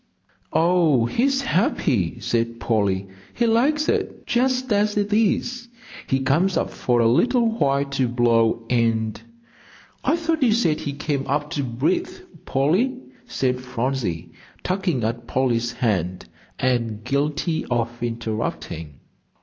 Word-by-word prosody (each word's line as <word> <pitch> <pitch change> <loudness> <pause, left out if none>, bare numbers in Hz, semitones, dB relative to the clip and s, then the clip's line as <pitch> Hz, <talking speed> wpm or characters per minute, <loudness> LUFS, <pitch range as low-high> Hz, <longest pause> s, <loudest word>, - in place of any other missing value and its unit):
"Oh, 165 -7 +3
he's 270 - +1
happy," 150 - 0
said 115 0 -1
Polly, 100 -4 0 0.3
"he 235 - +1
likes 275 +7 +2
it - - -1
just 255 0 +1
as 210 +1 +1
it 205 0 0
is. 235 +3 0 0.4
He 135 0 +1
comes 165 +9 +2
up - - -1
for 120 -1 +1
a 115 - +4
little 240 - +3
while 140 -8 +1
to 135 -2 0
blow 115 -1 +2
and 115 -2 0 0.4
" - - -26
"I - - +3
thought 325 -1 -1
you 240 -5 +4
said 170 -9 +1
he 145 -3 -4
came 140 -1 -2
up 145 +2 -1
to 150 - -1
breathe, 130 +8 0 0.4
Polly," 175 - +1 0.3
said 125 -1 -1
Phronsie, 125 -8 -3 0.3
tugging 180 - -1
at 115 +1 -3
Polly's 120 -2 0
hand, 90 -7 -1 0.3
and 115 -4 -1
guilty 145 +5 -1
of 120 -1 -1
interrupting. 110 - -4
135 Hz, 135 wpm, -23 LUFS, 115-195 Hz, 0.4 s, a